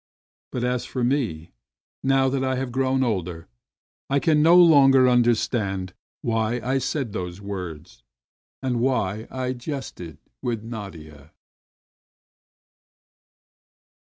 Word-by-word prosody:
But 125 - -3
as 125 0 0
for 130 -1 -4
me, 115 - -1 0.5
now 135 0 +3
that 130 0 0
I 130 0 0
have 130 -1 -3
grown 130 +1 +1
older, 90 -8 -3 0.6
I 140 - +2
can 150 0 +3
no 165 +3 +7
longer 135 -6 +7
understand 110 -6 +1 0.3
why 115 +1 0
I 130 +3 0
said 130 -5 -2
those 90 0 -5
words 90 -11 -7 0.6
and 125 -2 0
why 115 -4 0
I 130 -1 -3
jested 120 - -7 0.2
with 115 -3 -2
Nadia. 80 -10 -9
120 Hz, 110 wpm, -24 LUFS, 95-130 Hz, 0.6 s, no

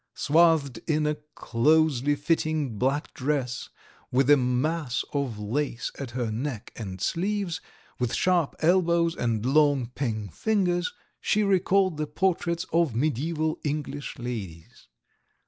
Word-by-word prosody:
Swathed 155 -5 +3
in 155 -2 +1
a 150 - +2 0.2
closely 145 +2 +2
fitting 150 -5 -1
black 135 +4 0
dress 130 -2 -2 0.4
with 135 +2 +3
a - - +10
mass 130 +1 0
of 140 -6 -1
lace 120 +4 -2
at 140 -3 -4
her 120 -2 -2
neck 120 0 -4
and 95 -4 -6
sleeves, 190 - -1 0.4
with 125 -2 0
sharp 175 -5 +2
elbows 170 0 +3
and 115 -2 -1
long 145 -1 +3
pink 110 -8 -3
fingers, 180 - +1 0.3
she 215 0 +1
recalled 190 -2 +2
the 150 0 -2
portraits 170 +1 0
of 165 -6 +3
mediæval 155 +5 0
English 145 -1 -4
ladies. 100 - -7
145 Hz, 125 wpm, -26 LUFS, 125-165 Hz, 0.4 s, a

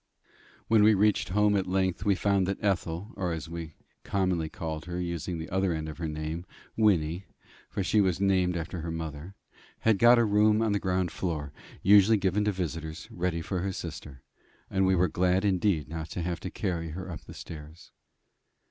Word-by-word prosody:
When 110 -1 +5
we 105 +1 +6
reached 105 +1 +2
home 105 +2 +3
at 95 -2 0
length, 95 -1 0
we 100 -2 +4
found 95 0 +1
that 100 - -1
Ethel, 95 0 -1
or, 90 -4 -1
as 80 -1 -5
we 80 -2 -7 0.3
commonly 90 -5 0
called 80 -1 -5
her, 90 0 -4
using 85 0 -3
the 80 0 -7
other 95 -1 +1
end 80 -1 -3
of 80 +1 -8
her 85 - -2
name, 80 +2 -4 0.3
Wynnie 90 -4 +2 0.4
for 100 - -2
she 105 +3 +3
was 95 -3 +1
named 95 -3 +2
after 85 +1 -4
her 85 - -4
mother 80 +2 -6 0.5
had 110 -3 +3
got 120 +1 +7
a 120 - +4
room 105 +1 +4
on 110 - +1
the 100 - +1
ground 90 -2 0
floor, 75 -6 -3 0.3
usually 105 +2 +6
given 100 +1 +1
to 105 - +2
visitors, 80 -3 -5
ready 85 -1 -1
for 90 +2 -3
her 95 +2 -1
sister; 75 -7 -7 0.5
and 95 -1 +2
we 95 - +4
were 90 0 +3
glad 90 +4 +1
indeed 95 -4 +1
not 80 0 -6
to 90 - -4
have 85 -1 -2
to 95 - -5
carry 85 -5 -3
her 90 +4 -6
up 85 - -8
the - - -11
stairs. 80 +1 -10
90 Hz, 195 wpm, -28 LUFS, 80-100 Hz, 0.5 s, got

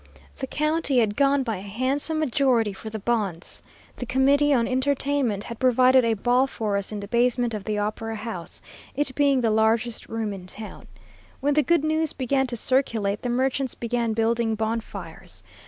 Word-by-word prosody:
The 265 - -4
county 305 -1 0
had 215 -4 +2
gone 280 +1 +3
by 225 -5 -2
a - - -8
handsome 255 +10 -1
majority 255 -7 +2
for 220 +3 -8
the 220 - -5
bonds. 205 -6 -2 0.4
The 245 - -5
committee 280 +3 +3
on 235 -4 +3
entertainment 260 -4 0
had 235 -1 -8
provided 255 0 +5
a 230 -1 +2
ball 245 +5 +2
for 215 -6 -2
us 200 +1 -2
in 210 - -4
the 200 - -7
basement 240 +1 +1
of 205 -2 -5
the 215 -1 -1
Opera 215 +2 -3
House, 210 -7 -7 0.3
it 280 -1 -1
being 280 -2 +3
the 225 -2 +2
largest 220 +2 +1
room 225 -2 -2
in 185 -2 -9
town. 215 +3 -10 0.5
When 290 +1 +1
the 300 - +4
good 305 +2 +2
news 315 0 0
began 265 0 0
to 240 -1 -3
circulate, 220 -5 0
the 245 - -3
merchants 260 +1 0
began 235 -1 -1
building 225 0 +1
bonfires. 200 - -5
235 Hz, 180 wpm, -25 LUFS, 220-270 Hz, 0.5 s, provided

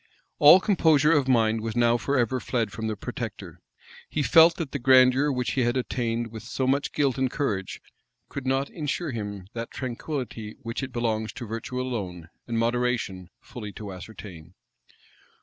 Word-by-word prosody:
All 150 +5 +9
composure 160 -6 +3
of 145 -5 +3
mind 115 -3 +3
was 110 0 -4
now 120 -1 +4
forever 130 -1 0
fled 115 -4 -1
from 110 0 -4
the 110 - -2
protector: - - -7 0.5
he 150 - -1
felt 165 +3 +6
that 155 -6 -5
the 140 - -3
grandeur 130 +2 +5
which 125 -2 -1
he 130 - 0
had 120 +1 +1
attained 120 -2 -2
with 110 -1 -8
so 130 - -3
much 140 +2 +1
guilt 140 -3 0
and 130 -1 +1
courage, 105 -10 -2 0.5
could 140 -2 -6
not 135 +1 0
insure 155 0 -3
him 105 -5 -5
that 115 0 -5
tranquillity 125 -4 -5
which 115 +3 -4
it 135 -1 -5
belongs 110 -2 -1
to 120 - -7
virtue 115 +3 -5
alone, 95 -10 -4 0.2
and 115 -1 -2
moderation, 115 -6 -1
fully 105 -4 -8
to 100 -3 -7
ascertain. 90 -3 -11
120 Hz, 165 wpm, -26 LUFS, 110-135 Hz, 0.5 s, All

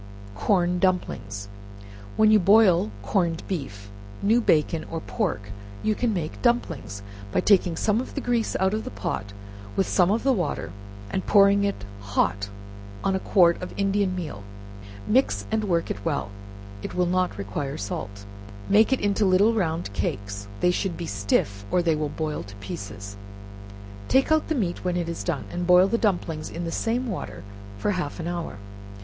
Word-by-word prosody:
Corn 180 - +1
Dumplings. 105 - -1 0.7
When 215 0 +6
you 215 - +7
boil 190 - +5
corned 170 - 0
beef, 100 - -5 0.3
new 225 +4 +4
bacon, 160 -4 +2
or 165 - -3
pork, 105 - -3 0.3
you 215 - +2
can 235 +2 0
make 170 -6 -3
dumplings, 140 - 0 0.3
by - - +2
taking 185 -4 +4
some 220 +6 +1
grease 245 -5 -1
out 190 +1 +2
of 220 - -1
the - - -5
pot, 100 0 -4 0.4
with 195 - +1
some 180 -2 +3
of 220 +3 +1
the 270 0 +4
water, 175 - -2 0.4
and 190 - -2
pouring 200 0 +6
it 200 - -2 0.2
hot 100 0 0 0.5
on 195 - +1
a - - 0
quart 175 -3 +4
of 180 - -6
Indian 195 -1 +1
meal, 155 - -5 0.7
mix 260 +5 +2
and 220 -1 +1
work 170 -4 0
it 100 - -5
well, 100 - -1 0.5
(it - - -6
will 180 - +2
not 185 +1 0
require 135 +9 -4
salt,) 100 - -5 0.4
make 215 +4 +5
it 265 - +3
into 205 +1 +1
little 200 +4 +4
round 165 - -1
cakes; 100 +2 -3
(they 180 - +4
should 180 -1 -2
be 170 - -4
stiff, 100 -2 0
or 180 - +2
they 165 -2 +3
will 150 -1 -1
boil 155 0 -3
to 100 +3 -11
pieces;) 100 0 -7 0.9
take 265 +3 +3
out 315 0 +3
the 315 - 0
meat 185 -9 -1
when 180 -1 0
it 170 -1 -1
is 170 0 -4
done, 170 -6 -2
and 175 0 -3
boil 180 +1 +7
the 230 +3 0
dumplings 175 -7 -1
in 170 - -5
the 165 - -3
same 235 +6 0
water 105 - -5 0.3
for 205 - 0
half 180 -4 -3
an 165 - -3
hour. 170 - -4
175 Hz, 175 wpm, -25 LUFS, -, 0.9 s, you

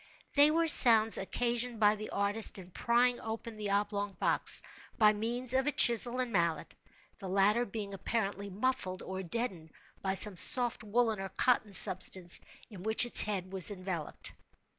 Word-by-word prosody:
They 290 +1 +4
were 330 +2 -1
sounds 225 -7 +6
occasioned 240 +3 -3
by 210 -1 +2
the 215 0 -9
artist 205 +2 -1
in 185 -1 -14
prying 240 +4 -1
open 225 0 -8
the 210 -1 -6
oblong 205 0 -3
box, 175 - +2 0.3
by 215 -1 +3
means 235 +4 -4
of 265 +2 -1
a - - +1
chisel 240 -1 +3
and 250 -2 -3
mallet—the 170 +2 -6
latter 205 +5 0
being 205 -1 -8
apparently 200 0 -5
muffled, 200 -3 -4
or 190 0 -7
deadened, 185 -4 -5 0.3
by 190 0 -3
some 200 -1 +2
soft 240 +4 +4
woollen 220 0 -2
or 195 0 -7
cotton 220 0 -1
substance 185 -2 0 0.3
in 205 -6 -13
which 220 +4 +2
its 240 - +10
head 195 -3 -5
was 190 0 +2
enveloped. 185 -5 -7
210 Hz, 160 wpm, -30 LUFS, 195-240 Hz, 0.3 s, its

